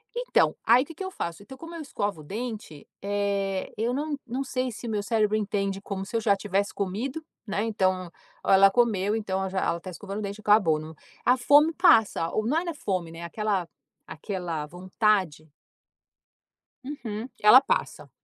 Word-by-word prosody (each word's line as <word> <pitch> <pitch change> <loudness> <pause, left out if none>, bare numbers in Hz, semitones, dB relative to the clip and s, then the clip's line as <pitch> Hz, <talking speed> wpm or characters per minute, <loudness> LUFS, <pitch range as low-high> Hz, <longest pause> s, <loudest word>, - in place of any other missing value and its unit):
Então, - - +2
aí 250 - +6
o - - -13
que 330 - -11
que 385 - -6
eu 375 - -5
faço? 170 - -5
Então 265 +5 -12
como 330 +3 -9
eu 330 - -6
escovo 205 - -3
o - - -12
dente, 215 - -6 0.2
eh, 200 -1 -1
eu 230 +3 0
não 290 +2 -2
não 260 +4 -2
sei 255 -1 -2
se 235 +2 -8
o - - -3
meu 210 -2 -1
cérebro 215 0 +1
entende 195 -2 -2
como 195 -1 -5
se 230 - -8
eu 225 - +1
já 205 -2 +3
tivesse 200 0 -1
comido, 235 +11 -3 0.2
né. 205 +1 -1
Então: 185 -5 0 0.3
"Ah - - +3
ela 195 +1 +7
comeu, 210 -2 +1
então 195 -4 -2
ela 190 0 -2
já 190 0 -2
ela 170 0 0
tá 185 - -9
escovando 195 +3 -6
o - - -4
dente, 200 +1 -5
acabou". 200 -8 +4
Não. 155 +1 -9 0.3
A 250 +1 +5
fome 290 +6 +5
passa. 225 - +4
O - - +2
não 225 - -2
não 310 - +2
era 340 -1 -4
fome, 185 - -3
né, 165 +1 -9
aquela 195 -1 -1 0.4
aquela 170 -3 -4
vontade 180 -3 -1 1.3
Uhum. 240 -4 -6
Ela 215 +5 +9
passa. - - -2
205 Hz, 195 wpm, -26 LUFS, 190-240 Hz, 1.3 s, Ela